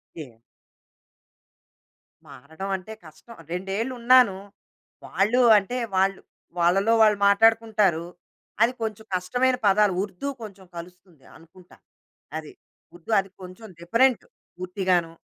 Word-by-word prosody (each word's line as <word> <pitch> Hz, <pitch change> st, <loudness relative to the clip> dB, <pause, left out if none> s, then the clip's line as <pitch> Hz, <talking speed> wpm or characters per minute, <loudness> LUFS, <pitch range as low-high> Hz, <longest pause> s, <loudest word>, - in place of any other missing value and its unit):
ఎ 150 Hz, -7 st, -10 dB, 2.0 s
మారడం 160 Hz, +9 st, -9 dB
అంటే 190 Hz, +4 st, -8 dB
కష్టం. 155 Hz, +9 st, -15 dB, 0.2 s
రెండేళ్ళున్నాను. 230 Hz, +4 st, +2 dB, 0.7 s
వాళ్ళు 220 Hz, +6 st, +1 dB, 0.2 s
అంటే 205 Hz, +5 st, -2 dB, 0.2 s
వాళ్ళు 195 Hz, +1 st, +1 dB, 0.4 s
వాళ్ళలో 195 Hz, +6 st, +2 dB
వాళ్ళు 215 Hz, -1 st, +4 dB
మాట్లాడుకుంటారు. 210 Hz, -4 st, +2 dB, 0.6 s
అది 235 Hz, +2 st, +4 dB
కొంచెం 220 Hz, -1 st, -5 dB
కష్టమైన 245 Hz, +8 st, 0 dB
పదాలు. 200 Hz, 0 st, +3 dB
ఉర్దూ 200 Hz, +6 st, -7 dB
కొంచెం 200 Hz, -3 st, -11 dB
కలుస్తుంది 175 Hz, -4 st, -13 dB
అనుకుంటా. 170 Hz, +3 st, -20 dB, 0.6 s
అది. 155 Hz, -1 st, -9 dB, 0.4 s
ఉర్దూ 175 Hz, +5 st, -10 dB
అది 195 Hz, 0 st, -5 dB
కొంచెం 185 Hz, +4 st, -11 dB
డిఫరెంట్ 230 Hz, +8 st, +2 dB, 0.3 s
పూర్తిగాను. 180 Hz, -2 st, -1 dB
195 Hz, 100 wpm, -24 LUFS, 180-225 Hz, 2.0 s, వాళ్ళు